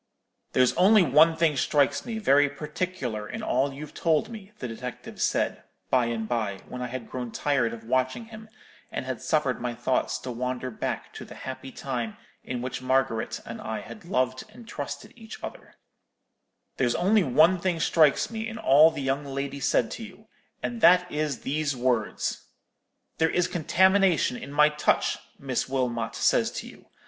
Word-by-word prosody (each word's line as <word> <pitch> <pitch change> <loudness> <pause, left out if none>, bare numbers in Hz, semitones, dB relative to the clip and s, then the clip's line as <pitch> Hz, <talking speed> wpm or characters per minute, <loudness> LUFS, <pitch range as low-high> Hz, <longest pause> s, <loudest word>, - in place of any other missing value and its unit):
"'There's 130 -1 +4
only 200 +2 +6
one 160 +3 +5
thing 160 -3 +3
strikes 140 - +1
me 230 -2 -3
very 145 -8 +4
particular 145 -7 -4
in - - -5
all 135 +3 +1
you've 145 +2 -9
told 165 +5 +1
me,' 210 -3 -10
the 125 - -5
detective 120 +1 -7
said, - - 0 0.3
by 125 -2 +3
and 115 -2 -3
by, 110 -5 -1
when 125 - -7
I 125 - -2
had 125 -2 -6
grown 125 -2 -5
tired 140 -5 +1
of 115 -1 -8
watching 130 - 0
him, 220 -1 -12 0.4
and - - -4
had 130 -2 -4
suffered 140 -7 0
my 120 -1 -3
thoughts 125 +2 0
to 130 - -5
wander 125 +1 -3
back 110 - -4
to - - -8
the - - -11
happy 130 0 -7
time 120 -5 -4 0.3
in 125 -1 -4
which 130 0 -4
Margaret 130 -3 0
and - - -7
I - - -4
had - - -11
loved 130 0 0
and 230 +1 -14
trusted 145 -5 -6
each 225 -1 -11
other; - - -9 1.0
'there's 125 -2 +1
only 200 +4 +3
one 160 +6 +4
thing 175 -2 -1
strikes 155 +3 +3
me 225 0 -4
in 225 0 -6
all 150 -3 +6
the 160 -4 -5
young 135 +2 0
lady 140 0 -4
said 120 -3 +1
to 230 - -6
you, 220 0 -12 0.4
and 235 -1 -3
that 180 -1 +6
is 150 -4 -2
these 145 0 -1
words—'There 125 +6 -3
is 180 +1 +1
contamination 190 -2 +3
in 135 - -8
my 150 +1 +5
touch,' 150 0 +1 0.2
Miss 130 -2 -2
Wilmot 120 -4 -1
says - - +3
to - - -5
you. - - -15
140 Hz, 175 wpm, -26 LUFS, 125-170 Hz, 1.0 s, only